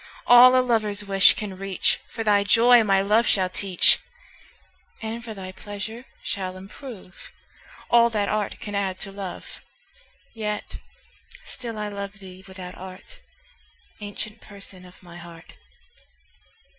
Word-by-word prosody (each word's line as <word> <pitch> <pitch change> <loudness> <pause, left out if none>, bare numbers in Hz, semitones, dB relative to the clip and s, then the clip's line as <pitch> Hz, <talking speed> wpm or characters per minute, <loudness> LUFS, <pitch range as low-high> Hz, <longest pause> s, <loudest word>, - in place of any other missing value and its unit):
All 250 +1 +8
a 255 - +1
lover's 210 -4 0
wish 195 -1 +5
can 205 -2 -5
reach, 195 -1 0
For 225 - -5
thy 205 -2 +3
joy 235 +3 +6
my 195 -2 +3
love 215 +4 +3
shall 185 -2 +2
teach; 185 -1 +3 1.0
And 230 +1 -5
for 225 -2 -7
thy 185 -1 -7
pleasure 205 +5 -8 0.2
shall 185 -2 -4
improve 195 0 -11 0.6
All 235 0 +6
that 210 -3 -1
art 210 -1 -2
can 205 - -7
add 195 -2 -1
to 195 - -6
love. 195 -2 -8 0.7
Yet 210 -2 -4 0.7
still 235 -4 -7
I 210 0 -3
love 200 -1 -6
thee 190 -2 -13
without 185 -1 -9
art, 190 - -12 0.8
Ancient 210 +1 -6
Person 195 -2 -10
of 180 0 -17
my 175 -1 -12
heart. 170 -1 -13
200 Hz, 135 wpm, -24 LUFS, 190-220 Hz, 1.0 s, All